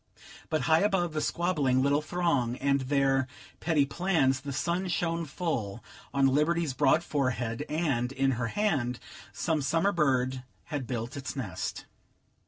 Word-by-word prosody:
But 155 -2 +1
high 160 +5 +4
above 190 -5 +1
the 155 - -1
squabbling 150 -7 +1
little 140 +2 +3
throng 150 -8 0
and 140 0 +1
their 135 0 +2 0.3
petty 160 -4 +2
plans, 140 -5 +1
the 140 0 -5
sun 170 +7 -1
shone 170 -1 -1
full 135 - -3 0.3
on 140 -1 +2
Liberty's 150 +2 +2
broad 135 +5 +3
forehead, 130 -4 -1
and, 145 -6 0
in 135 0 +1
her 120 -2 -1
hand, 130 - 0 0.3
some 160 -3 -1
summer 165 +8 +2
bird 130 -6 +1 0.2
had 140 -5 -4
built 120 +2 -4
its 140 0 -5
nest. 110 -10 -4
140 Hz, 145 wpm, -29 LUFS, 130-165 Hz, 0.3 s, high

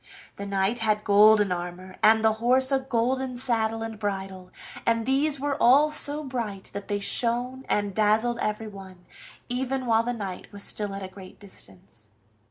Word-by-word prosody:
The 200 - -6
knight 200 +4 0
had 215 -1 0
golden 210 -1 +5
armor, 180 +1 -5
and 220 +1 +5
the 220 - +4
horse 260 +3 +4
a 270 - +3
golden 260 0 -1
saddle 225 -3 -1
and 225 -2 -7
bridle, 190 -3 -4 0.3
and 230 -1 +1
these 280 +2 +1
were 285 0 -1
all 285 +5 +5
so 300 0 0
bright 230 -8 -5
that 200 0 -6
they 205 -1 -1
shone 245 +5 0
and 205 -1 0
dazzled 220 +3 +1
everyone, 195 -4 -5 0.4
even 260 +1 -2
while 225 -1 +3
the 240 +1 -2
knight 195 -5 -7
was 200 -1 -7
still 205 -2 -2
at 195 - -6
a - - -5
great 185 0 -13
distance. 110 - -15
220 Hz, 170 wpm, -26 LUFS, 200-250 Hz, 0.4 s, golden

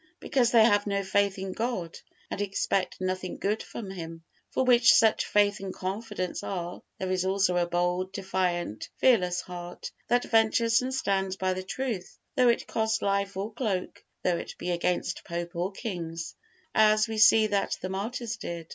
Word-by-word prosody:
Because 255 -5 +2
they 230 -2 +6
have 205 -2 +3
no 200 -1 0
faith 200 +1 +1
in 190 0 -4
God, 190 -6 -3 0.3
and - - -3
expect 195 -2 -1
nothing 185 0 -3
good 210 +2 -1
from 200 -5 -7
Him. 165 -3 -7 0.3
For - - 0
where 250 -2 +5
such 225 -2 +5
faith 205 0 +3
and 195 -1 -5
confidence 195 -1 -4
are, 175 -2 -4 0.2
there 185 -1 -3
is 185 -1 +1
also 190 -1 +2
a 175 -1 +2
bold, 175 +2 0
defiant, 185 - -2
fearless 180 -9 +3
heart, 175 -1 -8 0.2
that 245 0 +2
ventures 225 +1 +3
and 255 +1 -3
stands 195 -7 0
by 185 -1 0
the 185 - -4
truth, 215 -1 -4 0.2
though 250 -3 +5
it 235 - +1
cost 220 0 0
life 200 -1 0
or 205 +3 -3
cloak, 210 -6 -3 0.2
though 175 -1 +2
it - - -7
be 180 - -3
against 175 +1 -1
pope 170 0 -5
or 180 +3 -1
kings; 170 -6 -5 0.4
as 215 0 +5
we 220 -1 -3
see 220 0 +7
that 205 -2 0
the 185 - -3
martyrs 230 +4 -3
did. 170 -5 -6
195 Hz, 175 wpm, -28 LUFS, 180-220 Hz, 0.4 s, see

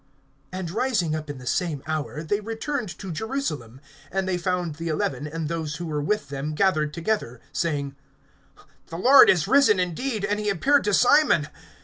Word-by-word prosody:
(33)And 180 -2 -5
rising 210 -10 0
up 155 -1 -6
in 145 - -5
the 125 - -11
same 155 0 -1
hour, 155 0 -3
they 205 +6 0
returned 225 +2 -4
to 190 -3 -7
Jerusalem; 155 - -4 0.3
and 190 0 -1
they 185 - 0
found 180 -2 -1
the 165 +1 -5
eleven 150 -3 -2
and 160 +1 -4
those 160 -2 -3
who 175 - -5
were 150 -2 -2
with 210 +6 -1
them 145 +2 -4
gathered 155 -5 +2
together, 165 - -2
(34)saying: 145 -5 -2 0.9
The 165 - -7
Lord 260 +10 +7
is 175 -3 +3
risen 265 -5 +5
indeed, 200 +5 -2
and 205 +1 -1
he 210 -1 -1
appeared 275 - +2
to 205 - +1
Simon. 245 - +4
170 Hz, 175 wpm, -24 LUFS, 150-210 Hz, 0.9 s, Lord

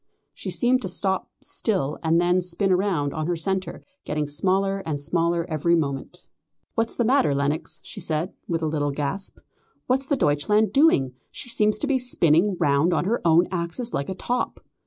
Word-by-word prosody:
She - - -6
seemed 255 +1 +2
to 190 - -3
stop 190 +1 0
still 180 - -1
and 165 0 +2
then 175 +1 +3
spin 180 +2 +1
round 180 -7 0
on 155 0 -3
her 175 - 0
centre, 190 +3 -3 0.2
getting 150 0 -2
smaller 195 +6 +1
and 150 -3 -3
smaller 170 +2 0
every 170 +1 +1
moment. 140 -4 -3 0.5
"What's 225 0 0
the 240 - +1
matter, 255 - +3
Lenox?" 140 +3 -1
she - - -8
said, 160 +4 -1
with 165 -1 -1
a - - +1
little 150 -2 0
gasp. 145 +7 -3 0.5
"What's 265 +2 0
the 285 - +1
Deutschland 210 - +2
doing? 270 - +4 0.2
She 245 - -7
seems 215 -2 +2
to 295 - -2
be 275 -2 +1
spinning 185 -6 +2
round 145 +5 +3
on 175 - 0
her 230 +5 0
own 170 +1 +4
axis 180 +7 -3
like 140 - -2
a 190 - -3
top." 245 +6 -2
175 Hz, 180 wpm, -24 LUFS, 155-210 Hz, 0.5 s, doing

